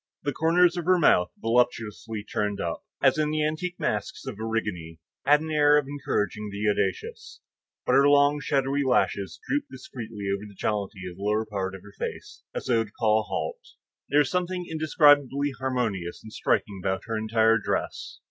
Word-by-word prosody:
The 145 - -1
corners 175 +2 +3
of 175 - -3
her 185 0 +5
mouth 90 - +4
voluptuously 115 -2 0
turned 105 -2 -2
up, 85 -1 -3 0.2
as - - +4
in 150 -1 +1
the 155 0 0
antique 175 +4 -4
masks 195 -10 -2
of 115 -6 -6
Erigone, 105 -8 -3 0.3
had 150 +1 +6
an 160 0 -5
air 150 -1 +5
of 150 - +1
encouraging 105 -7 -2
the 100 +1 -2
audacious; 455 - -3 0.5
but - - +2
her 140 +1 +6
long, 145 +1 +4
shadowy 140 0 0
lashes 125 -7 0
drooped 290 +1 -1
discreetly 110 - -7
over 100 +1 -4
the 100 - -15
jollity 100 -1 -2
of 90 0 -9
the - - -11
lower 105 +2 +1
part 95 -3 -3
of 95 - -12
the 105 0 -14
face - - -6
as - - -4
though 115 -2 +2
to 110 - -12
call 110 0 +2
a - - -2
halt. 485 -1 -3 0.5
There 145 - +2
was 145 - -1
something 180 0 -1
indescribably 145 -3 +3
harmonious 115 -10 -2
and 110 0 -11
striking 100 -3 0
about 95 -1 -1
her 115 - -3
entire 110 +1 +3
dress. - - -3
120 Hz, 185 wpm, -26 LUFS, 105-150 Hz, 0.5 s, had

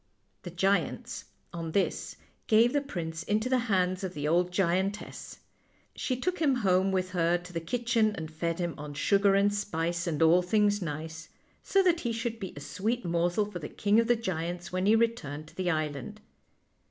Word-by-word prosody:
The 175 - -7
giants, 195 +3 -1 0.3
on 165 -2 -5
this, 200 - 0 0.3
gave 230 +3 +5
the 290 - +2
prince 165 - -5
into 215 +8 0
the 260 -1 +3
hands 185 -1 +1
of 185 -3 -4
the 145 0 -2
old 175 +3 +2
giantess. 190 +2 -1 0.6
She 255 - -2
took 365 +6 -1
him 290 -5 +3
home 185 +1 +3
with 185 -1 -1
her 175 -1 +2
to 180 +1 -12
the 165 - -1
kitchen, 230 +3 +1
and 160 -3 -6
fed 165 +1 -2
him 175 -2 -2
on 145 0 -7
sugar 200 +5 +3
and 200 +1 +3
spice 170 -4 -2
and 155 -3 -1
all 170 +3 +6
things 205 +2 +2
nice, 160 0 -5 0.3
so 390 -1 +2
that 350 -2 +3
he 240 -7 -2
should 230 0 -3
be 190 -3 -5
a - - -7
sweet 220 +9 -2
morsel 175 +4 +1
for 205 -4 -7
the 150 - -6
king 205 +2 +2
of 230 - +2
the 240 - +4
giants 175 -5 -4
when 185 +1 0
he 215 - +6
returned 155 -11 -1
to - - -20
the 185 -1 -1
island. 155 +5 -3
185 Hz, 190 wpm, -29 LUFS, 170-215 Hz, 0.6 s, all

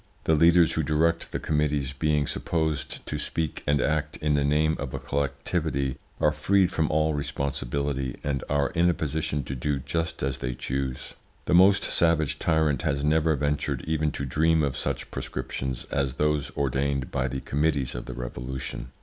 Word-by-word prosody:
The 80 - +3
leaders 85 +1 +5
who 80 - 0
direct 80 +2 +1
the - - -2
committees 75 -3 0
being 75 +1 +1
supposed 80 -2 -2
to - - -3
speak 80 -3 -2
and 75 0 +3
act 75 0 0
in 75 -1 0
the 70 -1 +2
name 75 +2 +2
of 70 -2 -4
a - - -3
collectivity, 70 -1 -1 0.2
are 75 - +4
freed 90 +5 +2
from 80 -3 +1
all 80 0 +2
responsibility, 70 -2 -2
and 70 -2 -1
are 70 -1 +1
in 85 0 +3
a 85 - +2
position 75 -1 -2
to 65 - -5
do 70 +3 -1
just 80 +4 -3
as 70 0 -1
they - - -3
choose. 65 0 -3 0.3
The - - 0
most 95 +3 +6
savage 80 -3 +2
tyrant 80 -3 +2
has 70 -3 0
never 80 +1 +3
ventured 75 +1 -1
even 80 -1 +1
to 70 - -3
dream 80 +4 +2
of 70 -3 0
such - - -3
proscriptions 65 0 -4
as 70 -3 0
those 75 -1 +1
ordained 70 0 0
by 65 -2 0
the 65 +1 -3
committees 70 -3 0
of - - -6
the - - -7
Revolution. 60 +2 -5
75 Hz, 175 wpm, -26 LUFS, 70-80 Hz, 0.3 s, most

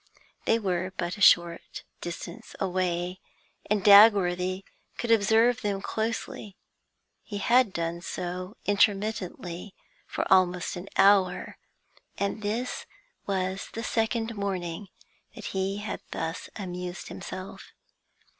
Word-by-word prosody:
They 225 - +4
were 185 -3 -1
but 175 0 -2
a 205 - -11
short 170 -3 +4 0.2
distance 170 0 -7
away, 180 -1 -1 0.5
and 210 -2 +1
Dagworthy 195 -3 +6 0.3
could 235 - -1
observe 225 +2 +4
them 200 -2 -1
closely; 220 -1 -4 0.6
he 205 - -6
had 240 +1 +4
done 170 0 -3
so, 180 +3 -5
intermittently, 200 -3 0 0.3
for - - -2
almost 180 -1 +2
an 180 +2 -7
hour, 195 -3 +4 0.6
and 200 +2 -2
this 225 +5 -3 0.4
was 190 -1 -2
the 225 - -4
second 225 0 0
morning 195 -2 -3 0.5
that - - -9
he 190 +1 -1
had 210 0 -5
thus 165 +1 -4
amused 180 -2 -6
himself. 185 +1 -8
195 Hz, 110 wpm, -27 LUFS, 180-210 Hz, 0.6 s, Dagworthy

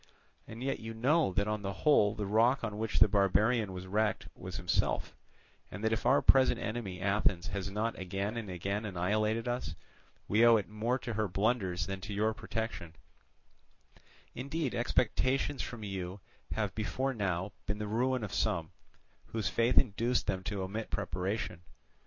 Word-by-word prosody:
And 115 +3 -7
yet 135 0 -1
you 115 0 -7
know 140 - +3
that 100 +2 +1
on 105 -1 -1
the 100 -1 -3
whole 110 -9 +5
the 105 -1 -3
rock 115 +6 +3
on 105 -2 -3
which 110 0 -1
the 110 - +7
barbarian 105 +2 +2
was 90 0 -6
wrecked 105 +3 0
was 90 +1 -8
himself, 90 -6 0 0.6
and 100 +3 -8
that 110 0 +2
if 110 - -1
our 135 - +5
present 130 -1 +5
enemy 110 -5 -4
Athens 100 -2 +1
has 100 -1 -3
not 110 +3 -2
again 95 +4 -3
and 115 -4 -4
again 100 +4 -2
annihilated 105 +4 0
us, 120 - -2 0.5
we 110 +3 +4
owe 115 -1 +8
it 105 - -3
more 110 +4 -1
to 120 -2 -5
her 110 0 0
blunders 95 -3 0
than 95 0 -5
to 105 +2 -5
your 110 +2 +2
protection; 110 -6 -4 1.4
Indeed, 140 +2 -2
expectations 130 +3 +1
from 115 -3 -6
you 95 -1 -4 0.3
have 105 -3 -1
before 110 +6 -1
now 95 -3 -1 0.2
been 105 - -1
the 105 - -3
ruin 125 +3 0
of 105 - -5
some, - - 0 0.6
whose 110 -4 -2
faith 115 +2 +1
induced 120 +1 +3
them 95 -3 -1
to 100 -2 -2
omit 105 +4 -4
preparation. 90 -1 -2
105 Hz, 170 wpm, -32 LUFS, 95-115 Hz, 1.4 s, owe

